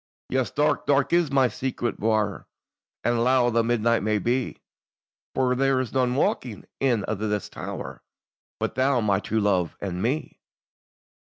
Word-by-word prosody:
"Yes, 130 -1 0
dark, 150 0 0
dark 140 +1 +2
is 170 -3 +3
my 135 -2 +4
secret 120 -1 -3
bouir, 110 -2 0 0.6
And 120 -1 +2
lown 125 -1 +3
the 115 0 +3
midnight 115 -1 +2
may 105 +1 +1
be; 120 +4 -1 0.8
For 130 -1 +2
there 135 0 +2
is 130 -3 -3
none 125 -1 +1
waking 125 -5 -1
in 120 -6 +1
a' - - 0
this 105 0 -2
tower - - -7 0.6
But - - -1
thou, 130 0 +2
my 100 -3 +2
true 110 +1 -1
love, 95 -5 +1
and 90 -2 -4
me." 140 +8 -2
120 Hz, 155 wpm, -25 LUFS, 110-130 Hz, 0.8 s, my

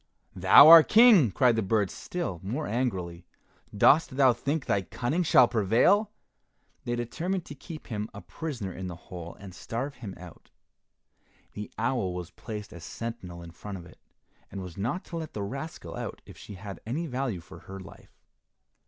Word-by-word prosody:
"Thou - - +8
our 165 0 +12
King!" 215 - +6
cried 120 +5 +3
the 110 - +1
birds 100 -1 0
still 170 - -5
more 120 +11 -3
angrily. 95 -8 -3 0.5
"Dost 140 +4 +4
thou 130 -3 +5
think 140 +5 -3
thy 100 - +1
cunning 125 - -2
shall 130 -7 +5
prevail?" 120 - +3 0.8
They 120 - -1
determined 170 +10 -3
to - - -9
keep 155 +2 -10
him 105 -2 -4
a - - -9
prisoner 120 - -6
in 95 0 -6
the 90 - -6
hole 85 0 -10
and 100 -2 -10
starve 130 +9 -5
him 105 -6 -8
out. 90 -2 -13 1.0
The 105 0 -7
owl 115 -6 -1
was 90 -1 -6
placed 105 +3 -8
as 85 - -11
sentinel 95 -8 -7
in 85 - -10
front 100 +3 -8
of 85 - -11
it, - - -17 0.5
and 95 - -6
was 90 -2 -9
not 125 - -3
to 170 - -6
let 160 -2 -6
the 105 - -4
rascal 135 +10 -7
out - - -6
if - - -13
she 100 - -11
had 100 +1 -8
any 140 +10 -3
value 125 - -3
for 85 - -13
her 95 0 -10
life. 95 - -15
115 Hz, 180 wpm, -28 LUFS, 95-140 Hz, 1.0 s, our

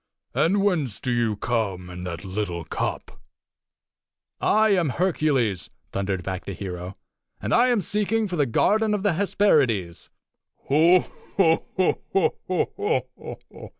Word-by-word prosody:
And 195 +4 +2
whence 155 - 0
do 125 - -2
you 120 -3 +1
come 100 -5 -2
in 90 0 -7
that 85 -1 -6
little 95 -3 -3
cup?" - - -4 1.2
"I 220 +1 +3
am 180 -7 +2
Hercules!" 140 - 0 0.2
thundered 95 -2 -2
back 95 0 -5
the 100 - -5
hero. 90 0 -6 0.4
"And - - -2
I 240 +2 +5
am 240 -4 +2
seeking 210 +3 0
for 180 - -4
the 145 -4 +1
garden 210 - +2
of 200 - -3
the 205 -4 +2
Hesperides!" 140 - +1 0.5
"Ho! 165 +6 +5 0.4
ho! 185 +1 +2 0.2
ho!" 300 - -2
145 Hz, 125 wpm, -24 LUFS, -, 1.2 s, I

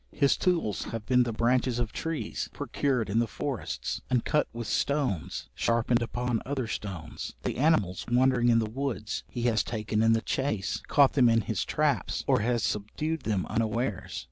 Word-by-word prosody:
His 140 -2 +3
tools 165 - 0
have 115 -2 -5
been 125 -1 +4
the 120 -1 +1
branches 120 +2 +1
of 120 -3 -2
trees, 165 -2 -3
procured 130 -6 -1
in 105 +3 +1
the 120 - +1
forests, - - -4
and 125 -2 +1
cut 150 - +2
with 115 0 -5
stones 130 - -1
sharpened 120 +1 +1
upon 120 0 -1
other 135 -1 -2
stones; 95 - -6
the - - -2
animals 125 - +2
wandering 125 -1 +4
in 115 - +5
the 115 - +2
woods 115 -2 -3
he 120 - -4
has 115 -4 +2
taken 110 -1 -1
in 115 0 +5
the 115 - +1
chace, 110 -8 -1
caught 140 -2 +5
them 125 -4 +5
in 115 0 +4
his - - -2
traps, - - 0
or - - +3
has 115 +1 0
subdued 150 +10 -2
them 100 -4 0
unawares. 115 -1 -2
120 Hz, 175 wpm, -28 LUFS, 110-130 Hz, -, in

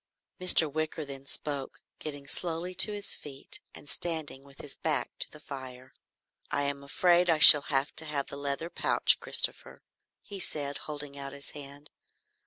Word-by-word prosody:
Mr. 180 -3 +7
Wicker 155 +1 -4
then 140 -1 -11
spoke, 140 -3 -6 0.2
getting 145 -2 -7
slowly 170 +4 -3
to 190 +4 +1
his 205 -1 -2
feet 140 -2 -9 0.2
and 145 - -15
standing 160 -3 -4
with 140 0 -19
his 145 - -8
back - - -2
to - - -4
the - - -12
fire. 130 -1 -11 0.6
"I 145 -1 -2
am 140 0 -4
afraid 175 +5 +2
I 165 - +3
shall 150 -1 +11
have 135 -1 -1
to 160 - +2
have 145 -2 -3
the - - -8
leather 140 +4 -5
pouch, - - +3
Christopher," - - +1 0.4
he 200 -1 -10
said, 145 -5 -4
holding 145 -1 -5
out 140 0 -8
his 140 0 -8
hand. 145 0 -11
145 Hz, 170 wpm, -28 LUFS, 140-160 Hz, 0.6 s, shall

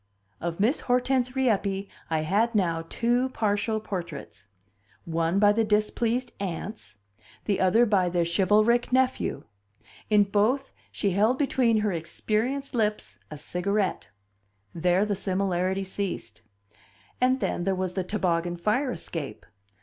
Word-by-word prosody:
Of 170 +1 -4
Miss 230 +9 +2
Hortense 250 0 +1
Rieppe 200 -6 0 0.2
I 160 -1 +1
had 210 +9 +1
now 165 -4 0
two 245 +2 +1
partial 215 -2 0
portraits 170 - -7 0.6
one 165 +2 0
by 205 0 +6
the 225 +2 +2
displeased 225 +3 0
aunts, 190 - -5 0.5
the 200 - 0
other 190 +6 +4
by 195 -5 +2
their 175 -1 +1
chivalric 210 +8 +3
nephew; 260 0 +1 0.7
in 210 -1 +5
both 215 +7 +1 0.2
she 200 - -1
held 215 +7 +2
between 245 -6 +2
her 210 -1 +1
experienced 215 - -2
lips, 215 -3 -1
a 150 - -7
cigarette; 190 +5 -1 0.6
there 180 +4 +2
the 205 -1 -1
similarity 190 -1 0
ceased. 190 - -5 0.8
And 255 +1 +3
then, 175 - -1
there 195 +1 +1
was 185 -1 -2
the 190 - -1
toboggan 175 -3 -1
fire 225 +9 0
escape. 160 - -6
205 Hz, 130 wpm, -26 LUFS, 180-230 Hz, 0.8 s, by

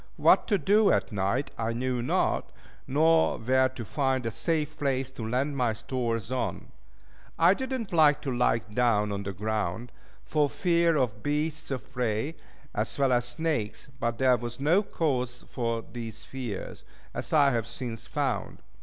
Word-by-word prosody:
What - - +5
to 205 - +3
do 205 +6 +4
at - - +1
night 105 +7 -1
I 115 0 0
knew 125 +1 -1
not, 120 - 0 0.4
nor 160 +4 +3
where 130 +3 +3
to 130 -3 -7
find 130 +1 0
a 115 - -1
safe 155 +3 -1
place 135 -2 0
to 115 -4 -5
land 135 +4 0
my 125 -4 +1
stores 115 -1 -3
on. 130 -2 -3 0.7
I 170 +3 +6
did 260 +5 -4
not 230 -8 -3
like 155 -3 +5
to 130 -3 -2
lie 120 -1 +3 0.2
down 105 -3 +2
on 100 0 -2
the 100 0 -4
ground, 105 +3 -2 0.3
for 150 -2 +2
fear 170 -2 +2
of 115 -6 0
beasts 150 +1 -1
of 130 -1 -5
prey, 125 +3 -1 0.4
as 105 +1 -1
well 135 -2 +3
as 120 0 +2
snakes, 140 -5 -1
but 115 -1 -1
there 130 0 +4
was 120 +1 -6
no 160 +8 +4
cause 125 - -2
for 115 -2 -2
these 115 -2 -6
fears, 125 -7 -6 0.3
as - - -4
I 145 -3 +5
have 115 -3 -1
since 115 -1 -6
found. - - -2
130 Hz, 170 wpm, -28 LUFS, 115-150 Hz, 0.7 s, I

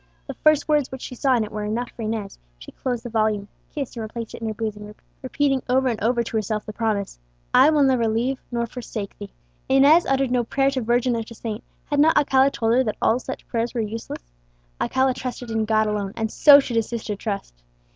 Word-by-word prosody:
The - - -6
first 310 -1 +2
words 300 -3 +1
which 265 -1 -7
she - - -7
saw 260 +1 +2
in 230 - +1
it 210 - -7
were 210 0 -4
enough 230 +4 -3
for - - -10
Inez; 215 -2 -4 0.2
she - - -12
closed 245 -3 -4
the 240 - -6
volume, 215 -2 0 0.2
kissed 280 -5 -5
and 230 - -5
replaced 225 +1 -6
it - - -9
in 225 - -3
her 220 - -2
bosom, 210 -1 -5 0.3
repeating 270 0 0
over 260 +1 +3
and 220 -3 -3
over 235 +1 +2
to 225 - -3
herself 215 0 -2
the 215 - -7
promise, 210 - -2 0.3
"I - - +7
will 300 -2 +3
never 255 -4 +3
leave 240 +5 0
nor 235 -1 -1
forsake 225 -4 -7
thee." 205 -1 -8 0.4
Inez 280 +6 +5
uttered 270 -1 +1
no 250 -1 +2
prayer 270 +3 +1
to 265 -2 -2
Virgin 240 +1 +1
or 230 - -1
to 230 +1 -10
saint: 220 0 -5 0.2
had 290 - -1
not 315 +2 +5
Alcala 270 -2 +4
told 225 -4 0
her 255 +2 +4
that 215 -4 -3
all 230 - +2
such 260 - -7
prayers 235 +1 -2
were 235 - 0
useless? 215 - -6 0.5
Alcala 260 0 +2
trusted 245 -1 -6
in 220 -1 0
God 215 0 +2
alone, 205 -2 -2
and 220 -1 -2
so 285 -1 +8
should 245 -4 -2
his 225 - 0
sister 225 -3 -4
trust. 200 - -5
235 Hz, 230 wpm, -23 LUFS, 215-260 Hz, 0.5 s, so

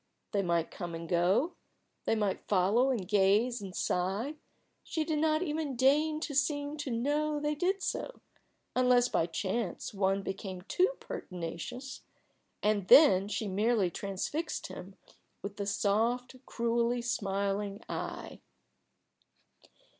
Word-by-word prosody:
They 200 - +1
might 170 -3 0
come 175 -3 -5
and 165 0 -6
go; 185 - +2 0.5
they - - +2
might 205 -3 -1
follow 205 +7 +3
and 220 -9 -1
gaze 210 +4 +3
and 190 -2 -7
sigh 195 +10 -1 0.5
she 320 - -2
did 310 -1 -1
not 310 +2 +2
even 305 -4 -2
deign 300 +5 +3
to 305 - -3
seem 290 +1 0
to 295 -2 -4
know 295 +5 0
they 295 0 0
did 370 +6 0
so, - - -3 0.6
unless 250 -1 +4
by 165 - +1
chance 190 +4 -3
one 195 0 +1
became 190 -2 -5
too 370 - +2
pertinacious, 180 +10 -6 0.6
and 205 -3 +1
then 200 - +8
she 210 +1 -2
merely 205 -1 +2
transfixed 200 - -3
him 185 +1 -9 0.5
with 200 +1 -6
a 200 - -2
soft, 225 +5 +1
cruelly 235 +1 0
smiling 200 -3 -1
eye. - - -5
225 Hz, 130 wpm, -31 LUFS, 195-280 Hz, 0.6 s, then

